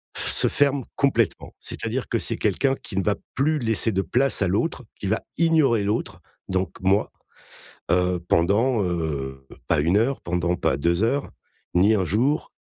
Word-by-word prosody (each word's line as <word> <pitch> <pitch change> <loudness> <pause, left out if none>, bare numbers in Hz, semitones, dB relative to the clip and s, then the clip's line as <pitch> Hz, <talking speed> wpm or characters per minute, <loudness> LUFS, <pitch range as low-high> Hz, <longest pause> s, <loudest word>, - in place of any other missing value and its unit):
f - - +2
se - - +3
ferme 140 -3 +1
complètement. 120 -6 0
C'est-à-dire - - -4
que, - - +1
c'est - - -2
quelqu'un 135 -1 +1
qui 100 - -8
ne 95 - +1
va 105 - +1 0.2
plus 150 +3 +1
laisser 115 -1 +1
de 95 -1 0
place 120 +10 +1
à 95 - +3
l'autre, 115 - -1 0.2
qui - - -6
va 110 +3 0 0.2
ignorer 155 -10 +3
l'autre, 105 +3 -2 0.3
donc 95 0 -1
moi, 95 +3 +2 0.8
heu, 90 0 +2
pendant, 105 +7 +2
heu, 70 -7 -3 0.2
pas 80 -3 +2
1 85 +6 +2
heure 125 +5 0
pendant 85 0 -1
pas 65 - 0
2 85 +7 +1
heures, 140 +5 0 0.4
ni 100 +5 +4
1 95 -4 +1
jour, 120 - 0
105 Hz, 170 wpm, -24 LUFS, 90-130 Hz, 0.8 s, ni